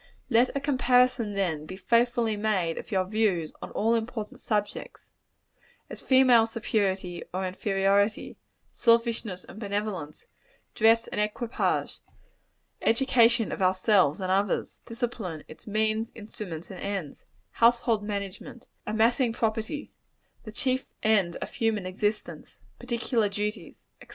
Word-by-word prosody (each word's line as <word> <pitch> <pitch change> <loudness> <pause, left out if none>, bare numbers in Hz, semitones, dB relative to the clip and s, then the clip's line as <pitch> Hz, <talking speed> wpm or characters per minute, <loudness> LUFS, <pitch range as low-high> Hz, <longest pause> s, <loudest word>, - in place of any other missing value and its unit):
Let 240 +2 +5
a - - +1
comparison, 250 -5 +2
then, 160 -6 -1
be 185 - -7
faithfully 235 0 +2
made 200 -6 0
of - - -9
your 190 -2 +1
views 190 -6 0
on - - -6
all 225 +2 +2
important 225 -1 -3
subjects: 210 -2 -3 0.8
as - - -6
female 255 -4 +5
superiority 195 -6 -1
or 185 +1 -2
inferiority; 195 +2 +1 0.4
selfishness 230 -5 +1
and 215 - -12
benevolence; 200 -7 -4 0.5
dress 225 +1 +4
and 210 - -2
equipage; 220 +3 -1 0.8
education 235 -1 +3
of - - -4
ourselves 185 -3 +3
and 185 -1 -2
others; 195 +1 0
discipline 230 -9 -4
its 155 - -14
means, 215 +1 0
instruments 200 -6 -8
and 185 - -8
ends; 195 -8 -5 0.3
household 235 -1 +3
management; 200 +3 -6 0.2
amassing 230 +3 +2
property; 225 +6 -2 0.5
the 215 - -7
chief 255 +3 0 0.2
end 200 -6 +3
of - - -6
human 220 -4 -1
existence; 205 +3 -3 0.2
particular 235 -3 0
duties, 210 +2 -4 0.2
&c. - - -14
215 Hz, 120 wpm, -27 LUFS, 195-230 Hz, 0.8 s, Let